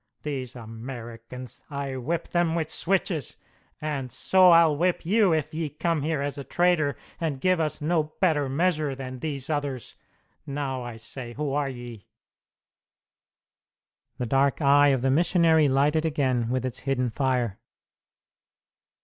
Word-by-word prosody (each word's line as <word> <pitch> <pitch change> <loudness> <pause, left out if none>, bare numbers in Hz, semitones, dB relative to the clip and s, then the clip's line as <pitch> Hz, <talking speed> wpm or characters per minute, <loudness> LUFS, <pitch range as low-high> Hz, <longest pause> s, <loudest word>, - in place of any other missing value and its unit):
These 130 -4 -4
Americans 115 +1 -9
I 140 -2 -4
whip 155 +6 -3
them 175 -2 +1
with 160 -2 -1
switches! 175 - -1 0.4
And 140 -4 -3
so 185 -1 +5
I'll 165 -3 +6
whip 175 +3 0
you 200 +1 +4
if 155 0 0
ye 160 -1 -2
come 160 +2 -1
here 150 -1 -1
as 145 0 -3
a - - -5
trader 175 -3 +1 0.2
and 155 -5 -2
give 185 +3 +2
us 155 -1 -1
no 155 0 +1
better 155 -7 +2
measure 155 -1 +1
than 130 -1 -7
these 140 -2 -4
others! 145 -5 -3 0.5
Now, 140 -2 -3
I 120 -2 -7
say, 120 +1 -8
who 145 +1 -3
are 145 -1 0
ye?" 120 -4 -9 2.1
The 125 - -2
dark 135 +3 +2
eye 145 -1 +5
of 135 -3 +2
the 135 - +3
missionary 165 0 +4
lighted 145 +4 +2
again 130 -7 0
with 130 0 -1
its 130 - -3
hidden 125 -3 -1
fire. 125 -5 0
140 Hz, 145 wpm, -26 LUFS, 130-160 Hz, 2.1 s, I'll